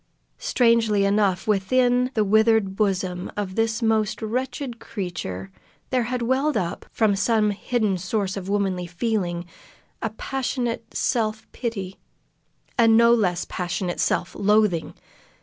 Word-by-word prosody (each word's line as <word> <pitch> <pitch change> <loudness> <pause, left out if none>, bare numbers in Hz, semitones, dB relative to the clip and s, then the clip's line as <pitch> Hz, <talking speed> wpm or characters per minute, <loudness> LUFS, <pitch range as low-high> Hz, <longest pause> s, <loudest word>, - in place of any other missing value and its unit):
Strangely 230 -4 +3
enough, 200 -1 +1
within 245 +5 +2
the 215 - +3
withered 220 -1 +3
bosom 185 -3 -1
of 200 -2 -3
this 225 +2 0
most 220 -2 +1
wretched 245 +2 -3
creature 130 - -5 0.4
there 250 -2 +1
had 245 0 -2
welled 270 +5 +1
up, 175 0 -3
from 215 -3 +2
some 210 +1 +2
hidden 205 -2 -1
source 190 +1 -2
of 195 -1 -6
womanly 190 -3 0
feeling, 175 -2 -2 0.6
a - - -1
passionate 245 -4 -3
self 220 -3 0
pity, 195 -6 -5 0.8
a 230 - +6
no 235 +1 +6
less 180 -7 +1
passionate 180 0 -3
self 175 - 0
loathing. 205 -4 +2
215 Hz, 125 wpm, -24 LUFS, 190-230 Hz, 0.8 s, a